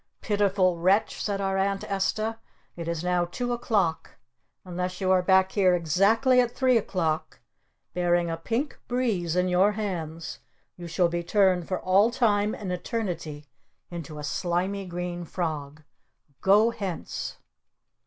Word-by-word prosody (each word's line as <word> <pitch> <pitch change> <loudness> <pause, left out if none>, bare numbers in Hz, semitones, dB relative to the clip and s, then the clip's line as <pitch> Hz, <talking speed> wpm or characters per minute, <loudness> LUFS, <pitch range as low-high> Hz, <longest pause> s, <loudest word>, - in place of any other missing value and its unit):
"Pitiful 195 -4 +1
Wretch!" 190 +5 +2
said 200 -2 -1
our 195 -1 0
Aunt 195 +1 0
Esta. 215 +2 -1 0.4
"It 170 -1 -6
is 170 -1 -2
now 180 -1 +2
two 245 +7 -3
o'clock. 200 -9 -1 0.5
Unless 180 0 -4
you 190 -1 +1
are 185 -1 +5
back 190 +1 +4
here 185 -3 +3
exactly 200 - +3
at 245 - 0
three 260 -2 +3
o'clock 175 -7 -1 0.5
bearing 175 -1 +2
a 165 - -2
Pink 230 - -3
Breeze 215 -10 0
in 180 0 +2
your 185 +3 +3
hands 170 -5 -4 0.4
you 175 -1 -8
shall 170 +1 +2
be 170 0 -2
turned 185 -1 +2
for 185 - -2
all 195 +4 +4
time 215 -4 +1
and 195 -3 -5
eternity 175 -7 -4 0.5
into 160 -3 -7
a 150 - -6
Slimy 180 +6 -1
Green 175 0 -4
Frog! 155 -3 -4 0.6
Go 210 +4 +5
hence!" 200 -7 -5
185 Hz, 145 wpm, -26 LUFS, 175-205 Hz, 0.6 s, are